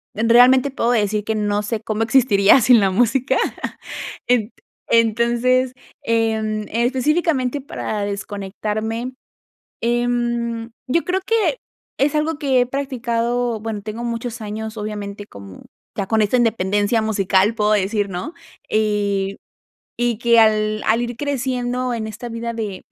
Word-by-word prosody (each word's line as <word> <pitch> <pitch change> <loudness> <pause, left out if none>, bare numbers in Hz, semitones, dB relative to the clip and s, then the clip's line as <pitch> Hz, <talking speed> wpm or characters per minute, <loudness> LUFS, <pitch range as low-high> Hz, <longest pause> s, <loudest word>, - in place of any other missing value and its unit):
en 220 +2 0
realmente 250 +3 +6
puedo 240 -3 0
decir 210 -2 +1
que 220 0 -2
no 205 -1 0
sé 215 +1 -3
cómo 220 0 -3
existiría 225 -2 +5
sin 240 0 +6
la 195 -2 +3
música. 245 +6 +2 0.9
Ent 245 -2 +2 0.4
entonces, 235 +3 +2 0.3
em, 220 -2 0
específicamente 260 +3 +1
para 220 -5 -4
desconectarme, 210 +4 -4 0.7
em, 235 -1 -1 0.2
yo 330 +6 +1
creo 370 +1 0
que 455 +2 +1 0.4
es 280 +2 +2
algo 305 0 0
que 270 -4 +2
he 245 - +2
practicado, 245 -3 -1
bueno, 220 -1 -4
tengo 220 +3 -6
muchos 235 0 -4
años, 220 +1 -5
obviamente, 205 -1 -5
como 100 - -12 0.3
ya 195 - -2
con 220 +1 +2
esta 210 +4 +2
independencia 215 -1 +1
musical, 200 0 +2
puedo 210 0 +2
decir, 205 0 +1
¿no? 190 - -5 0.4
Y 200 -2 0 0.6
y 240 -2 +1
que 235 -1 +5
al 215 -1 +2
al 230 +2 +3
ir 240 -1 -4
creciendo 255 -3 -2
en 220 -2 -3
esta 220 +3 -7
vida 235 0 -4
de, 210 -4 -5
230 Hz, 135 wpm, -20 LUFS, 210-245 Hz, 0.9 s, realmente